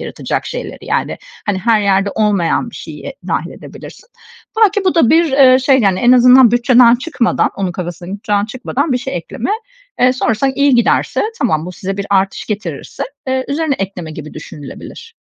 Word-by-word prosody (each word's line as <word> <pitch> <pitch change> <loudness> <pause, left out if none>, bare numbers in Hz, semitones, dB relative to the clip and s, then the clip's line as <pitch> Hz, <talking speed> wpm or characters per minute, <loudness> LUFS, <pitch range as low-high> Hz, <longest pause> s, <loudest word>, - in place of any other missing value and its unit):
yaratacak - - -4
şeyleri, - - -6
yani, - - -2 0.3
hani, 205 -2 0
her 220 +2 +2
yerde 195 0 +1
olmayan 205 -6 0
bir - - -15
şeyi - - -8
dâhil - - -2
edebilirsin. 475 - -12 0.5
Belki 410 -1 +3
bu 370 - +2
da 325 -9 +3
bir, 325 -2 +3
eee, 260 -2 +6
şey, 265 0 +3
yani, 195 -3 +2
en 245 +5 +4
azından 250 -1 +7
bütçeden 240 0 +5
çıkmadan, 250 -1 0
onun 190 -2 -2
kafasındaki 175 +1 -6
bütçeden 205 -1 -1
çıkmadan 255 +5 -3
bir 250 - +1
şey 260 -4 -5
ekleme, 225 - -5 0.5
eee, 250 +1 +5
sonrasında 255 +1 0
iyi 280 -1 +3
giderse, 240 - +1 0.2
tamam, 160 -9 0
bu 180 - -7
size 190 +2 -5
bir 200 0 -4
artış 195 0 0
getirirse, 210 0 -5 0.3
eee, 260 0 -1
üzerine 295 0 0
ekleme 185 -4 -5
gibi 155 -1 -9
düşünülebilir. 155 - -10
235 Hz, 175 wpm, -15 LUFS, 195-265 Hz, 0.5 s, azından